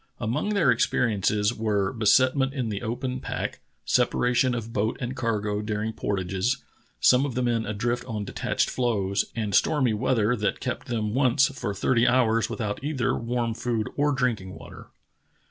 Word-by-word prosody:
Among 125 - -1
their 165 -10 +3
experi 115 -3 +1
ences 105 +3 +1
were 105 -2 0
besetment 130 +4 +3
in 125 -4 -2
the 105 -1 -4
open 125 +3 -3
pack, - - -4 0.3
separation 125 +1 +2
of 115 -1 -5
boat 110 +2 0
and 125 0 -4
cargo 105 -4 -1
during 105 +1 -2
portages, 95 +3 -1 0.4
some 125 +1 +5
of 140 -4 -3
the 125 - 0
men 115 -3 0
adrift 120 +4 -2
on 110 -5 -4
detached - - -1
floes, 100 -6 0
and 105 -3 -2
stormy 130 -1 +3
weather 110 +1 +1
that 105 -3 -1
kept - - -4
them 110 -3 -2
once 130 +1 +3
for 115 -7 -4
thirty 115 +4 +2
hours 115 -2 +3
without 105 +1 -4
either 145 -4 0
warm 115 0 -2
food 115 -2 -2
or 145 +1 +2
drink 125 -6 0
ing 95 0 -9
water. - - -12
115 Hz, 165 wpm, -26 LUFS, 105-125 Hz, 0.4 s, some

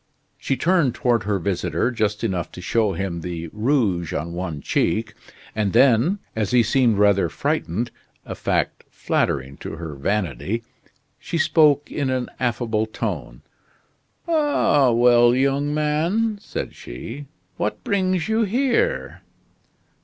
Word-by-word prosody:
She 135 - -1
turned 165 -3 +2
toward 120 -5 +1
her 105 -1 +1
visitor 95 +6 -1
just 110 -2 -1
enough 95 -6 -2
to - - -9
show 105 +3 +1
him 85 -1 -3
the 85 -1 -5
rouge 105 - 0
on 85 +3 -3
one 85 -4 -4
cheek, 110 +9 0 0.4
and 105 -3 0
then, 130 - +4 0.2
as 110 -2 -1
he 125 -1 +4
seemed 120 -2 +2
rather 100 -4 +3
frightened 105 +10 -2 0.3
a - - -5
fact - - -1
flattering 70 +1 -1
to - - -7
her 80 -1 -6
vanity 95 - -2 0.6
she 170 - -4
spoke 150 -3 +3
in 140 -3 -1
an 130 -1 -1
affable 115 -3 0
tone. 90 - -5 0.8
"Ah, 290 - +3
well 120 0 +5
young 140 +2 +1
man," 165 +9 0
said - - -5
she, 115 - -8 0.3
"what 105 - -2
brings 185 -4 0
you 220 +1 +1
here?" 270 - 0
115 Hz, 130 wpm, -22 LUFS, 95-145 Hz, 0.8 s, well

